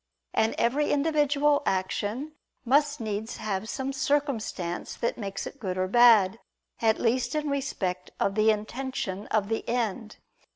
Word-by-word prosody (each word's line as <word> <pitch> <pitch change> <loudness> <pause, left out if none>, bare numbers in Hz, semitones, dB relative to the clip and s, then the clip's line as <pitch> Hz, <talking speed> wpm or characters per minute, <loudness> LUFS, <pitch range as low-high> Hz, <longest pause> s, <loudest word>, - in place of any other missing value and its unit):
And 220 - +2
every 280 +6 +1
individual 290 -1 +2
action 205 +9 -1 0.3
must 290 +3 +3
needs 220 0 -4
have 215 0 -3
some 270 +1 -3
circumstance 270 - -1
that 235 - -1
makes 195 -3 -5
it 280 - -9
good 185 -4 -3
or 185 0 +1
bad, 225 -2 +6 0.4
at 220 -1 +3
least 245 +5 0
in 300 -1 -1
respect 190 -10 -2
of 200 - +1
the 215 +2 +3
intention 215 -2 -2
of 210 -2 +1
the 225 +1 -2
end. 225 -2 -2
230 Hz, 140 wpm, -27 LUFS, 205-275 Hz, 0.4 s, bad